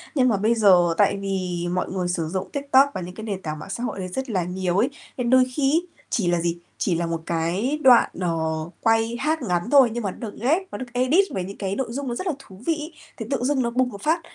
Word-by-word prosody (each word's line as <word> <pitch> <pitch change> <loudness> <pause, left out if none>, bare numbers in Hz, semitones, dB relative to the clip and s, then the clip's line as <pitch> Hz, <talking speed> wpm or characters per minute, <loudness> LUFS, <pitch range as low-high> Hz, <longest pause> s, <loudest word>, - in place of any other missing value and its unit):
nhưng 255 -2 +4
mà 205 - +2
bây 220 +4 +2
giờ 180 -6 +5
tại 200 -1 +3
vì 185 -3 -2
mọi 180 - -1
người 185 -2 -1
sử 170 -3 -1
dụng 185 +2 -3
TikTok 280 -1 +4
và - - -4
những 180 +1 -8
cái 220 - -8
nền 200 -3 -4
tảng 155 -2 -5
mạng 195 - -9
xã 235 +5 -4
hội 220 - -3
đấy 185 - -3
rất 260 +8 -4
là 185 -5 0
nhiều 180 +1 -2
ấy, 245 +7 +3 0.3
nên 240 -1 -1
đôi 260 0 +6
khi 275 -1 +2
ấy, 340 +3 +1 0.2
chỉ 195 -6 0
là 175 -1 +2
gì? 170 0 -1 0.2
Chỉ 175 - +1
là 170 0 -1
một 165 -1 -3
cái 180 - -1
đoạn, 250 -3 +7
ờ, 170 -2 0 0.4
quay 225 0 +2
hát 315 0 0
ngắn 180 0 -1
thôi 270 -4 +7
nhưng 240 -2 -3
mà 195 - -1
nó - - -13
được - - -12
ghép, 310 +10 +2
nó - - -5
được 255 - -5
edit 265 +11 +3
với 190 -2 -2
những 195 +2 -8
cái 195 -1 -2
nội 265 - -2
dung 275 +3 -4
nó 240 - -2
rất 370 - -4
là 335 - +1
thú 195 -5 -15
vị 330 - +3
ấy, 310 +1 -7 0.2
thì - - -5
tự 270 -3 -1
dưng 270 0 +1
nó 235 - 0
bùng 250 +1 +1
một 200 -3 -10
phát, 325 +2 +1
220 Hz, 280 wpm, -23 LUFS, 180-260 Hz, 0.4 s, đoạn